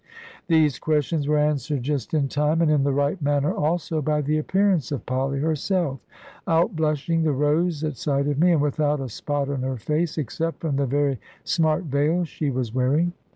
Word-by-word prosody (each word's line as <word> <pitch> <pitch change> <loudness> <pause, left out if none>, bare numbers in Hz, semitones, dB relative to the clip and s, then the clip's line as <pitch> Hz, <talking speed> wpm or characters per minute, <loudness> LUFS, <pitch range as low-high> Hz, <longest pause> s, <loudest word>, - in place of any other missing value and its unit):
These 160 -4 +3
questions 150 -1 0
were 150 0 +2
answered 150 -2 0
just 145 +2 -2
in 145 -3 +2
time, 150 +3 +1
and 155 - +3
in 145 -2 +3
the 140 - +1
right 145 +6 0
manner 145 +3 +1
also, 160 0 -1
by 150 +1 0
the 155 +2 +1
appearance 185 - +1
of 140 - -4
Polly 135 +2 -1
herself, 155 0 -1 0.5
outblushing 165 -2 +1
the 155 - +2
rose 150 +3 +1
at 155 -4 -3
sight 140 -1 0
of 145 -1 -1
me, 175 +2 +5
and 155 - +2
without 150 0 0
a 135 -2 -4
spot 145 +5 -2
on 140 -2 -2
her 130 0 -2
face, 155 +8 -1
except 160 +4 -3
from 150 -4 -1
the 140 -1 +1
very 140 -1 0 0.2
smart 160 +1 +1
veil 150 +4 +1
she 155 -2 -3
was 125 -4 -3
wearing. 145 +7 +1
150 Hz, 190 wpm, -24 LUFS, 140-160 Hz, 0.5 s, me